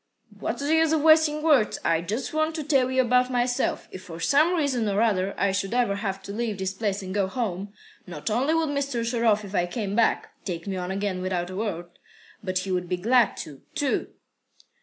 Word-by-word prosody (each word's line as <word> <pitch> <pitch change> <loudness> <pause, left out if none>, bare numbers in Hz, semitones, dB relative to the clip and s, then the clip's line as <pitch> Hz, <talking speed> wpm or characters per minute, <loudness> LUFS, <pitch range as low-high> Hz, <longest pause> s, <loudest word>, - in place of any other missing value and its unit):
"What's - - -3
the 295 +2 +1
use 320 -1 +3
of 310 -2 +1
wasting 315 -1 +5
words? 285 -9 +3
I 165 0 +2
just 220 - -4
want 310 +1 0
to 310 - -3
tell 275 -4 +2
you 260 0 +3
about 250 +1 +3
myself. 245 0 0
If 185 - -8
for 165 -1 -9
some 305 - +3
reason 265 -9 0
or 200 0 0
other 200 -4 +1
I 200 - +2
should 195 +3 -2
ever 235 -5 +1
have 195 -2 -4
to 200 - -7
leave 220 -2 -2
this 190 0 -2
place 200 -1 -2
and 185 0 -5
go 200 -2 +1
home, 200 -3 -3 0.4
not 160 -4 -8
only 265 +8 +2
would 325 -2 +1
Mr. 280 -5 -1
Sharov, 230 -3 +2
if 195 - -10
I 175 -3 +1
came 200 +1 -3
back, 230 0 +2
take 170 -3 -5
me 195 -2 -3
on 180 -1 -4
again 195 -1 -2
without 180 -1 -2
a - - -6
word, 175 -5 -4 0.4
but 185 -2 -1
he 190 - -3
would 180 -1 -1
be 180 - 0
glad 230 +3 +3
to, 145 -3 -12
too." 285 -2 0
215 Hz, 220 wpm, -25 LUFS, 190-260 Hz, 0.4 s, wasting